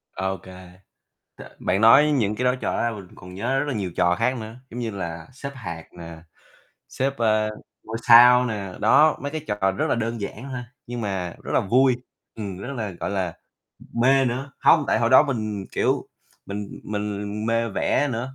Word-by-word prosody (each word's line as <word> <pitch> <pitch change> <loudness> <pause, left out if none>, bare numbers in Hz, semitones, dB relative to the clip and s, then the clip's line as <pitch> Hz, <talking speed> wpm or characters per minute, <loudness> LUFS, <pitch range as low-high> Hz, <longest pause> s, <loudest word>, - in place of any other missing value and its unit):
Ô 95 0 -2
kê, 90 -1 -13 0.7
T - - -11 0.2
bạn 95 +4 0
nói 145 +7 +7
những 110 -7 +1
cái 125 - -2
đó, 125 +1 +3
trò - - -3
đó - - 0
ra 120 - +1
mình 100 -4 -9
cũng - - -19
còn 90 0 -12
nhớ 125 +8 -1
rất 145 - -1
là 145 - -1
nhiều 100 -5 -3
trò 85 +1 +3
khác 125 +7 0
nữa, 110 +1 -7
giống 120 - -7
như 115 -2 -3
là 85 -4 -6
xếp 140 +1 -7
hạc 85 -9 -7
nè, 85 -1 -9 0.7
xếp, 135 +1 -1
ờ, 110 -2 +2 0.3
ngôi 110 +1 -5
sao 125 +1 +8
nè, 100 -5 -4
đó. 155 +1 +5
Mấy 140 0 -4
cái 155 - -4
trò 95 -2 +1
rất 95 - -1
là - - +2
đơn 115 -1 -3
giản 105 +4 -6
thôi, 125 - -4 0.2
nhưng 120 0 -5
mà 95 -5 -3
rất - - -5
là - - +4
vui, 125 +5 +3 0.4
ừm, 100 -4 -6
rất 120 +8 -6
là, 110 -4 -3
gọi 85 - -5
là, 95 -4 -2 0.7
mê 135 +1 +5
nữa. 130 +3 -2
Hông, 155 -3 +5
tại - - +2
hồi 115 0 +1
đó 130 - +8
mình, 110 -8 -3
kiểu, - - 0 0.4
mình 100 0 -6
mình 105 0 -4
mê 115 0 +1
vẽ 145 +7 +1
nữa 125 +2 -4
110 Hz, 210 wpm, -24 LUFS, 95-125 Hz, 0.7 s, sao